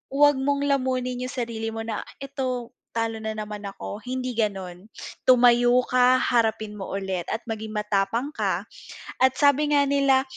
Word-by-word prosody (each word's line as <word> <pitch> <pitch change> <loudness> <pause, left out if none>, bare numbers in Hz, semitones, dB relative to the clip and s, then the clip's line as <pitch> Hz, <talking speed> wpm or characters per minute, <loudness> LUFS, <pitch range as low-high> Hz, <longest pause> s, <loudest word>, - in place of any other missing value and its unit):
huwag 290 -1 +5
mong 280 +1 0
lamunin 255 -2 0
yung 255 - -5
sarili 230 -3 -3
mo 225 - -4
na 225 -1 -3 0.2
eto 255 -3 -3 0.2
talo 225 -1 -1
na 220 0 -3
naman 210 -1 -6
ako 200 +1 -7
hindi 255 0 -3
ganon, 190 -3 -3 0.4
tumayo 245 0 +6
ka 255 0 +4
harapin 220 -3 +1
mo 190 - -6
ulit 190 -3 -3
at 225 - -2
maging 220 0 -5
matapang 210 +6 0
ka. - - -1 0.6
At, 260 0 +4
sabi 290 +1 +3
nga 285 -1 +5
nila 275 -1 +3
240 Hz, 155 wpm, -25 LUFS, 215-260 Hz, 0.6 s, tumayo